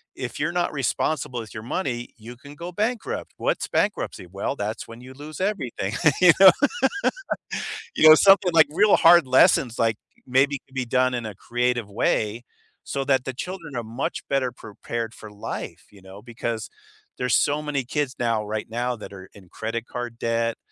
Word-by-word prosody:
if 125 Hz, +2 st, -6 dB
you're 160 Hz, +4 st, -1 dB
not 175 Hz, -1 st, 0 dB
responsible 135 Hz, -2 st, -1 dB
with 110 Hz, -, -11 dB
your 110 Hz, -, -7 dB
money, 120 Hz, -3 st, -3 dB
you 120 Hz, +2 st, -11 dB
can 145 Hz, +2 st, -13 dB
go 170 Hz, +3 st, -7 dB
bankrupt." 220 Hz, +5 st, -3 dB
"What's -, -, -1 dB
bankruptcy?" -, -, -1 dB
"Well, 95 Hz, +2 st, -3 dB
that's 105 Hz, +2 st, -4 dB
when 115 Hz, +1 st, -11 dB
you 130 Hz, +1 st, -11 dB
lose 150 Hz, +5 st, -9 dB
everything," 125 Hz, -, -2 dB, 0.3 s
you 180 Hz, -2 st, +9 dB
know. 190 Hz, -1 st, +10 dB, 1.4 s
You 155 Hz, -, +7 dB
know, 155 Hz, -, +11 dB
something 195 Hz, -1 st, +5 dB
like 160 Hz, -2 st, +7 dB
real 205 Hz, +6 st, +5 dB
hard 170 Hz, -4 st, +6 dB
lessons, 130 Hz, -2 st, +4 dB
like, 115 Hz, -2 st, +2 dB, 0.3 s
maybe 135 Hz, +2 st, +2 dB
could 130 Hz, -, -25 dB
be 125 Hz, -2 st, -1 dB
done 130 Hz, +1 st, +1 dB
in 120 Hz, -2 st, -3 dB
a 105 Hz, -, -8 dB
creative 120 Hz, -1 st, -1 dB
way, 110 Hz, +2 st, 0 dB, 0.4 s
so 140 Hz, -, -3 dB
that 130 Hz, -2 st, +2 dB
the 130 Hz, -, -4 dB
children 165 Hz, 0 st, -7 dB
are 120 Hz, -, -2 dB
much 115 Hz, +4 st, -4 dB
better 135 Hz, -3 st, +1 dB
prepared 115 Hz, 0 st, -6 dB
for 105 Hz, -1 st, -12 dB
life, 105 Hz, -, -7 dB
you 100 Hz, -2 st, -17 dB
know, 95 Hz, +2 st, -12 dB
because 115 Hz, -1 st, -4 dB, 0.5 s
there's 125 Hz, -2 st, +2 dB
so 145 Hz, +1 st, +2 dB
many 150 Hz, -3 st, -2 dB
kids 140 Hz, 0 st, -2 dB
now, 115 Hz, -3 st, 0 dB
right 105 Hz, 0 st, -4 dB
now 120 Hz, +2 st, -2 dB
that 105 Hz, -, -10 dB
are 95 Hz, -1 st, -11 dB
in 95 Hz, -3 st, -16 dB
credit 115 Hz, +1 st, -4 dB
card 120 Hz, -1 st, -6 dB
debt, 115 Hz, 0 st, 0 dB
125 Hz, 180 wpm, -24 LUFS, 115-145 Hz, 1.4 s, know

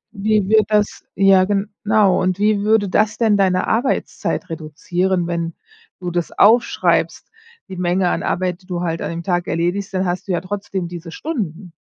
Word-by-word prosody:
wie 210 Hz, -1 st, 0 dB
wird 215 Hz, 0 st, +5 dB
das 210 Hz, -1 st, 0 dB
ja, 195 Hz, -1 st, +5 dB
genau. 205 Hz, 0 st, +1 dB
Und 185 Hz, 0 st, 0 dB
wie 210 Hz, 0 st, +2 dB
würde 210 Hz, 0 st, +2 dB
das 215 Hz, +3 st, +1 dB
denn 220 Hz, -3 st, +3 dB
deine 185 Hz, -2 st, +2 dB
Arbeitszeit 240 Hz, +4 st, -1 dB
reduzieren, 175 Hz, +3 st, -2 dB
wenn 170 Hz, -1 st, -3 dB, 0.5 s
du 180 Hz, -1 st, -4 dB
das 175 Hz, -1 st, -2 dB
aufschreibst, 235 Hz, +4 st, +2 dB, 0.4 s
die 190 Hz, -, -7 dB
Menge 180 Hz, +1 st, +1 dB
an -, -, -1 dB
Arbeit, 180 Hz, 0 st, -2 dB
die -, -, -22 dB
du 180 Hz, -2 st, -3 dB
halt 165 Hz, -2 st, -2 dB
an -, -, -3 dB
dem 170 Hz, 0 st, -5 dB
Tag 175 Hz, 0 st, -1 dB
erledigst, 175 Hz, +4 st, -1 dB
dann 185 Hz, 0 st, 0 dB
hast 175 Hz, +1 st, -3 dB
du 195 Hz, -, -2 dB
ja 175 Hz, -, 0 dB
trotzdem 195 Hz, -2 st, -4 dB
diese 170 Hz, -1 st, -8 dB
Stunden. 195 Hz, -, -5 dB
185 Hz, 175 wpm, -19 LUFS, 175-205 Hz, 0.5 s, wird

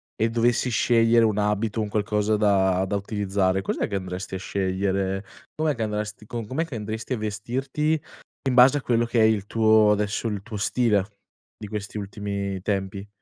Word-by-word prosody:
e 110 Hz, -, +1 dB
dovessi 120 Hz, +2 st, +1 dB
scegliere 115 Hz, +1 st, +4 dB
un 105 Hz, -2 st, +2 dB
abito, 105 Hz, +1 st, 0 dB
un 105 Hz, -1 st, -1 dB
qualcosa 105 Hz, 0 st, 0 dB
da 95 Hz, -3 st, +3 dB
da 100 Hz, -, -1 dB
utilizzare, 100 Hz, -2 st, 0 dB
cos'è 95 Hz, -, -2 dB
che 100 Hz, -, -4 dB
andresti 95 Hz, 0 st, -6 dB
a 95 Hz, -, -2 dB
scegliere? 95 Hz, 0 st, -1 dB, 0.3 s
Com'è 155 Hz, -2 st, 0 dB
che 115 Hz, -, -2 dB
andresti, 105 Hz, 0 st, -4 dB
co 115 Hz, +1 st, -5 dB
com'è 145 Hz, +8 st, -1 dB
che 165 Hz, -, -11 dB
andresti 110 Hz, +3 st, -4 dB
a 125 Hz, -, -1 dB
vestirti 130 Hz, +9 st, -2 dB, 0.5 s
in 125 Hz, -, 0 dB
base 130 Hz, +3 st, +7 dB
a -, -, -10 dB
quello 120 Hz, -2 st, +1 dB
che 120 Hz, 0 st, 0 dB
è 110 Hz, -, +6 dB
il 110 Hz, -3 st, +3 dB
tuo 110 Hz, -1 st, +4 dB
adesso, 105 Hz, +2 st, 0 dB
il 105 Hz, -3 st, -3 dB
tuo 110 Hz, +1 st, -7 dB
stile 105 Hz, -2 st, +2 dB, 0.5 s
di 105 Hz, -, -8 dB
questi 105 Hz, 0 st, -5 dB
ultimi 100 Hz, -1 st, -4 dB
tempi? 100 Hz, 0 st, -2 dB
105 Hz, 180 wpm, -24 LUFS, 100-115 Hz, 0.5 s, base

